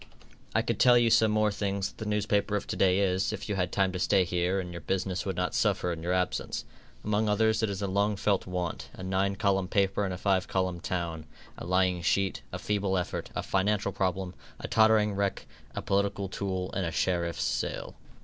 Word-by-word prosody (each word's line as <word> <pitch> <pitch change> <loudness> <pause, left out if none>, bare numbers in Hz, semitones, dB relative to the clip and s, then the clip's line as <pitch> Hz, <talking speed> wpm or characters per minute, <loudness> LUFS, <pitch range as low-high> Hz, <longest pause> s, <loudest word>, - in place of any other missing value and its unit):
I - - +3
could - - -2
tell 125 -1 +7
you 120 -1 +3
some 110 0 +5
more 105 0 +2
things 100 -1 -2
that - - -20
the 110 -2 -3
newspaper 105 0 +1
of 100 - -2
to - - -4
day 95 -1 +3
is, 95 -1 +1
if - - -5
you 105 - -1
had 90 -3 -1
time 95 -1 +2
to 90 - -4
stay 95 +1 +3
here 90 +2 0
and 90 -2 -5
your 85 0 -7
business 95 +1 -2
would 95 - -2
not 90 -1 -1
suffer 90 - +1
in 80 - -7
your 85 +2 -2
absence. 90 0 -1 0.4
Among 105 0 +1
others 110 +1 +2
it 110 - +1
is 100 0 -4
a - - 0
long 100 +2 +1
felt 100 -1 0
want, 90 -2 -3
a - - -8
nine 95 +1 0
column 95 -1 +1
paper 100 +1 +1
in 95 - -1
a 90 - -4
five 95 -1 +1
column 95 -2 -1
town, 85 -3 -3 0.3
a - - -8
lying 90 -1 +2
sheet, 95 +2 +1
a - - -4
feeble 100 -2 0
effort, 90 - -3
a - - -2
financial 100 +1 +1
problem, 95 -1 -2 0.3
a - - -5
tottering 110 -1 +4
wreck, 100 0 -1 0.3
a - - -3
political 100 0 0
tool 95 -1 -3
and 95 - -1
a - - -3
sheriff's 85 -2 0
sale. - - -2
95 Hz, 215 wpm, -29 LUFS, 90-100 Hz, 0.4 s, tell